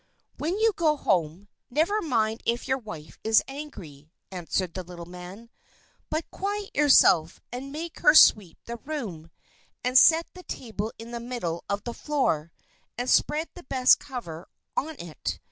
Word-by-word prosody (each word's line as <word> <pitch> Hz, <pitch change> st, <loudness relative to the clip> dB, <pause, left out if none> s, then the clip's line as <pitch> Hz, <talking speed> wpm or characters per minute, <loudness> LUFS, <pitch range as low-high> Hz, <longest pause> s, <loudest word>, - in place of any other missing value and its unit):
"When 335 Hz, +6 st, -1 dB
you 445 Hz, 0 st, +3 dB
go 310 Hz, -3 st, +2 dB
home, 175 Hz, -, 0 dB, 0.2 s
never 330 Hz, -, +1 dB
mind 225 Hz, -, 0 dB
if 235 Hz, +1 st, -1 dB
your 265 Hz, 0 st, +1 dB
wife 160 Hz, -, -10 dB
is 220 Hz, 0 st, +4 dB
angry," 185 Hz, -, -9 dB, 0.2 s
answered 180 Hz, -1 st, -2 dB
the 185 Hz, -, -4 dB
little 175 Hz, -1 st, -9 dB
man, 180 Hz, +6 st, -11 dB, 0.6 s
"but 315 Hz, +1 st, -2 dB
quiet 405 Hz, +1 st, -3 dB
yourself, 185 Hz, -, +5 dB
and 260 Hz, +3 st, -6 dB
make 320 Hz, +3 st, -6 dB
her 300 Hz, -, +6 dB
sweep 200 Hz, -, +6 dB
the 235 Hz, 0 st, -6 dB
room, 220 Hz, -, -6 dB, 0.5 s
and 250 Hz, +1 st, -1 dB
set 330 Hz, +1 st, +6 dB
the 365 Hz, -, -11 dB
table 220 Hz, -, -5 dB
in 230 Hz, +1 st, -10 dB
the 235 Hz, -, -4 dB
middle 235 Hz, -9 st, -4 dB
of 200 Hz, 0 st, -2 dB
the 240 Hz, -, -5 dB
floor, 170 Hz, -, -1 dB, 0.5 s
and 245 Hz, +1 st, -1 dB
spread 310 Hz, +2 st, +2 dB
the 355 Hz, -, -11 dB
best 260 Hz, -5 st, +4 dB
cover 180 Hz, -, -8 dB, 0.3 s
on 315 Hz, +2 st, -2 dB
it. 170 Hz, -3 st, -5 dB
235 Hz, 160 wpm, -26 LUFS, 180-300 Hz, 0.6 s, her